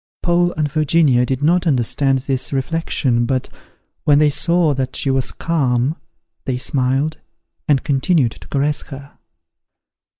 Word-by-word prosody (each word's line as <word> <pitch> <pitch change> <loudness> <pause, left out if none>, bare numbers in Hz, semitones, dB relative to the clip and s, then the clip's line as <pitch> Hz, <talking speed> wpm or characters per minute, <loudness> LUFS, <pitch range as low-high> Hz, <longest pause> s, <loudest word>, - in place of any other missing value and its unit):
Paul 175 0 +2
and 155 -1 -1
Virginia 150 -5 +2
did 130 +2 -2
not 175 +3 +2
understand 135 0 +1
this 130 -2 0
reflection; 135 -4 -1
but, 130 -2 -2 0.5
when 145 -1 +4
they 150 0 +4
saw 170 0 +2
that 130 -1 -3
she 135 - 0
was 130 -1 -1
calm, 140 -3 0 0.5
they 130 -2 -1
smiled, 135 +4 0 0.5
and 140 -3 +2
continued 140 -2 +1
to - - -13
caress 145 +2 -1
her. 140 0 -11
140 Hz, 135 wpm, -18 LUFS, 130-155 Hz, 0.5 s, when